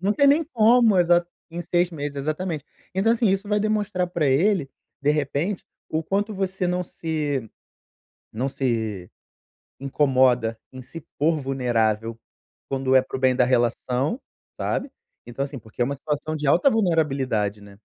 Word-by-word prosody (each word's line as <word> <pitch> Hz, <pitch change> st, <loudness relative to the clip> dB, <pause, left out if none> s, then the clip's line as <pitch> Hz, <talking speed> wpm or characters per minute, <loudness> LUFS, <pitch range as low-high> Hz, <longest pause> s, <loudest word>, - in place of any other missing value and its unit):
não 195 Hz, +3 st, +1 dB
tem 280 Hz, +6 st, +3 dB
nem 295 Hz, +4 st, +4 dB
como. 230 Hz, -, +4 dB
Exa 175 Hz, 0 st, +4 dB, 0.2 s
em 170 Hz, +1 st, -5 dB
6 175 Hz, +1 st, +1 dB
meses. 145 Hz, -3 st, -5 dB
Exatamente. 155 Hz, +2 st, -3 dB, 0.3 s
Então, 200 Hz, +4 st, +3 dB
assim, 235 Hz, 0 st, +1 dB
isso 195 Hz, +1 st, 0 dB
vai 210 Hz, 0 st, +1 dB
demonstrar 210 Hz, -3 st, 0 dB
pra 170 Hz, -4 st, 0 dB
ele, 155 Hz, +3 st, +2 dB, 0.3 s
de 145 Hz, -, +3 dB
repente, 150 Hz, +6 st, -2 dB, 0.2 s
o 160 Hz, +1 st, -1 dB
quanto 205 Hz, +5 st, -1 dB
você 190 Hz, -1 st, -1 dB
não 180 Hz, 0 st, 0 dB
se 150 Hz, -8 st, -3 dB, 0.8 s
não 125 Hz, +5 st, -2 dB
se 110 Hz, -9 st, -2 dB, 0.7 s
incomoda 130 Hz, -5 st, +2 dB
em 130 Hz, 0 st, -9 dB
se 165 Hz, +6 st, -10 dB, 0.2 s
pôr 160 Hz, +3 st, +2 dB
vulnerável, 115 Hz, -5 st, -1 dB, 0.5 s
quando 135 Hz, -1 st, 0 dB
é -, -, +7 dB
para 130 Hz, -, -6 dB
o -, -, -7 dB
bem 130 Hz, -1 st, +3 dB
da 125 Hz, -, +4 dB
relação, 125 Hz, -, 0 dB, 0.4 s
sabe. 270 Hz, -, -2 dB, 0.4 s
Então, 120 Hz, +3 st, -3 dB
assim, 140 Hz, 0 st, -7 dB
porque 110 Hz, +1 st, -14 dB
é -, -, +4 dB
uma 140 Hz, +3 st, -2 dB
situação 150 Hz, +2 st, -3 dB
de 150 Hz, -1 st, -3 dB
alta 170 Hz, -, +5 dB
vulnerabilidade, 135 Hz, -, 0 dB
né. 100 Hz, -1 st, -15 dB
150 Hz, 160 wpm, -24 LUFS, 130-185 Hz, 0.8 s, é